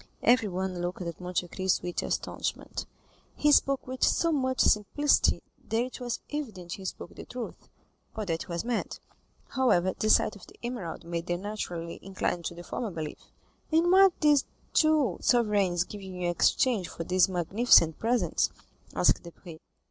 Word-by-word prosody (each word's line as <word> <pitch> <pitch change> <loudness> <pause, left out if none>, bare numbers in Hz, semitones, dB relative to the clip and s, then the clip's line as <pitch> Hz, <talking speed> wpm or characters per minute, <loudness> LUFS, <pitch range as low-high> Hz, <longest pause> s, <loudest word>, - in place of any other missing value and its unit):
Everyone 190 -6 +2
looked 180 +1 -3
at 170 0 -6
Monte 180 0 -2
Cristo 190 +1 0
with 175 - -2
astonishment; - - -3 0.5
he 295 - +3
spoke 275 -1 +3
with 260 0 -4
so 335 - +3
much 260 -3 0
simplicity 280 +8 +3 0.3
that 225 - 0
it 255 +1 -7
was 240 -1 -3
evident 215 -13 -5
he 190 - -6
spoke 180 - -6
the - - -9
truth, 245 -2 -8 0.5
or 215 - -2
that 165 -3 -2
he - - -7
was 170 +4 -4
mad. 240 -1 -2 0.5
However, 190 -9 +2
the 215 - -1
sight 215 - +4
of 195 - -14
the - - -16
emerald 235 -11 -5
made 170 0 -4
them 175 +1 -2
naturally 175 -5 -5
incline 185 -2 -2
to 170 - -5
the 175 - -9
former 230 +5 -4
belief. 160 -4 -6 0.5
"And 330 +2 +3
what 385 -1 +6
did 300 - +4
these 285 -2 +3 0.3
two 305 - +3
sovereigns 205 -7 +2
give 205 +3 -9
you 190 -1 -8
in 180 - -5
exchange 195 +2 +2
for 165 - -6
these 185 +2 +3
magnificent 180 -2 +4
presents?" 225 -7 +1 0.5
asked - - +3
Debray. 170 -1 -12
195 Hz, 170 wpm, -28 LUFS, 175-250 Hz, 0.5 s, what